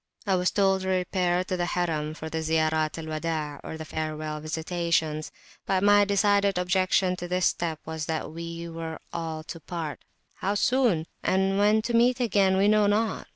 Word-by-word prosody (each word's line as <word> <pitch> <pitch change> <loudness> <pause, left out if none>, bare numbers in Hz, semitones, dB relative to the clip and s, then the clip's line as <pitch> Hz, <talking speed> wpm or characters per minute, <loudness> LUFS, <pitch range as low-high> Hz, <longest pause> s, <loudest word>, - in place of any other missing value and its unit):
I 195 - +1
was 180 0 +2
told 195 -1 +2
to 190 - -4
repair 180 -1 +1
to 185 - -3
the 175 -1 -1
Harim 155 -4 -1
for 160 - -7
the 160 0 -3
Ziyarat 155 -1 +1
al 165 - -6
Widaa, 155 -2 -3
or 160 - -6
the 160 - -7
Farewell 155 -1 -4
Visitation; 160 0 -1 0.5
but 190 0 +1
my 205 0 +6
decided 200 -1 +2
objection 185 +1 +2
to 175 - -5
this 180 0 +1
step 165 -3 0
was 160 -1 -4
that 160 -1 -3
we 170 +1 -6
were 165 -1 -6 0.2
all 160 -2 -4
to 165 - -8
part, 160 -3 -6 0.3
how 200 +2 -1
soon!and 195 -4 +1
when 210 +1 +4
to 235 - -2
meet 245 +2 +4
again 200 -5 +3
we 195 +1 +4
knew 210 -1 +4
not. 215 +2 0
175 Hz, 180 wpm, -26 LUFS, 160-195 Hz, 0.5 s, my